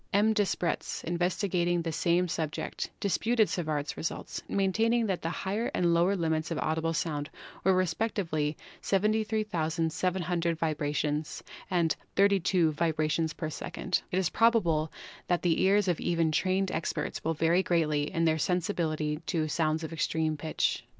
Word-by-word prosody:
M. 210 +2 +4
Despretz, 200 -5 -1
investigating 175 0 0
the 165 - -2
same 175 +3 +2
subject, 160 -1 -3
disputed 220 +3 +2
Savart's 155 -4 -2
results, 165 - -4
maintaining 225 +4 +2
that 190 -4 -1
the 165 - -2
higher 200 +6 -2
and 170 -1 +2
lower 175 +4 +3
limits 160 -3 -1
of 165 - -2
audible 160 +1 0
sounds 150 -2 -2 0.3
were 190 0 +4
respectively 165 -5 0 0.2
73,700 180 -5 0
vibrations 150 -1 -1 0.3
and 170 -4 +2 0.2
32 190 -4 +3
vibra 155 0 0
tions 160 -1 0
per 155 0 -4
second. 175 - -2
It 180 - 0
is 185 -3 +1
probable 170 -10 +3 0.4
that 175 -1 +1
the 170 -2 +2
ears 200 +1 +4
even 170 -1 +1
of - - -3
trained 190 +3 +1
experts 160 -2 -3
will 165 +1 0
vary 165 +4 +3
greatly 155 -5 +1
in 165 -2 +1
their 160 0 +2
sensibility 160 -3 0
to 160 -4 0
sounds 155 +1 0
of 160 - -5
extreme 160 -1 0
pitch. 155 +1 -1
170 Hz, 145 wpm, -29 LUFS, 155-190 Hz, 0.4 s, M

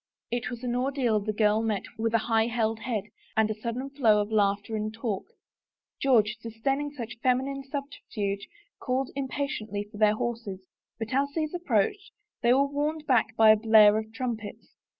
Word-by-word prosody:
It 240 0 -2
was 240 0 -7
an 245 -1 -1
ordeal 250 -4 +1
the 210 +1 -2
girl 215 0 +2
met 215 -3 -1
with 225 +1 0
a 225 - +1
high 225 -1 +2
held 225 -2 0
head 225 -5 -2 0.3
and 220 0 +3
a 215 0 -7
sudden 250 +4 -4
flow 230 -7 +4
of 205 +1 -2
laughter 205 0 +1
and 215 0 -2
talk. 225 -3 -4 0.7
George, 230 -5 +3
dis 225 -1 -9
daining 275 +4 0
such 235 -5 -7
feminine 265 +2 0
subterfuge, 250 -8 -4 0.3
called 260 0 -1
impatiently 265 -7 -3
for 210 - -10
their 215 -1 +5
horses, 215 -5 -4 0.3
but 225 +1 -5
as 280 +2 +2
these 310 -1 -1
approached, 345 - 0 0.3
they 240 -1 +4
were 270 +2 +5
warned 295 +2 -2
back 230 -5 +2
by 220 -1 +7
a - - +7
blare 215 -1 +6
of 220 0 -7
trumpets. 225 -3 -5
230 Hz, 175 wpm, -27 LUFS, 215-265 Hz, 0.7 s, by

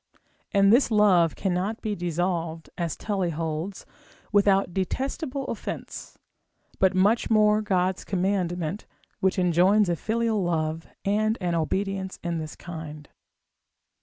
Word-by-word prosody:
and 200 +1 +5
this 250 +2 +4
love 195 -7 +4
cannot 190 +4 -1
be 215 -2 -2
dissolved, 170 -2 -2
as 170 -3 -2
Tully 195 -4 -1
holds, 165 +3 -4 0.5
without 195 -3 +3
detestable 270 - -2
offence: - - -6 0.6
but 190 -1 +3
much 205 +5 +3
more 215 -1 +4
God's 185 -2 0
commandment, 185 -1 -1 0.3
which 190 0 +1
enjoins 185 +3 +4
a 170 - +1
filial 225 +2 0
love, 160 -1 -1 0.2
and 215 +3 +1
an 175 -2 -1
obedience 190 +3 -2
in 170 -1 -2
this 155 -1 -6
kind. 155 -3 -8
185 Hz, 120 wpm, -26 LUFS, 170-210 Hz, 0.6 s, and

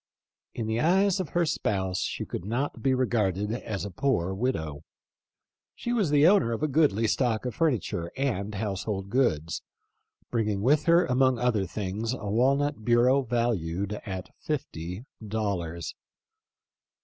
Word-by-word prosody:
In 115 - -2
the 110 +1 -1
eyes 190 +4 +3
of 185 - -2
her 175 -1 +1
spouse 95 - -1
she - - -2
could - - -5
not 120 +8 -2
be 135 -1 +2
re 130 0 +2
garded 105 -3 0
as 110 -4 -3
a 100 - -5
poor 95 -5 0
widow. 80 - -2 0.9
She 240 - -3
was 210 -9 +2
the 145 0 +5
owner 180 - +5
of 115 - -3
a - - +3
goodly 140 -7 +3
stock 115 0 +1
of 125 - -2
furniture 120 - 0
and 105 -7 -1
household 100 -1 -3
goods; 85 - +1 0.7
bringing 105 -4 0
with 145 +4 +3
her 170 +1 +5
among 130 0 +3
other 115 -5 +1
things 105 +5 -3
a 105 -5 -5
walnut 135 +3 +2
bureau 120 +4 +4
valued 105 -6 -1
at 95 -3 -5
fifty 90 - -4 0.2
dollars. 90 - -3
115 Hz, 150 wpm, -27 LUFS, 100-135 Hz, 0.9 s, the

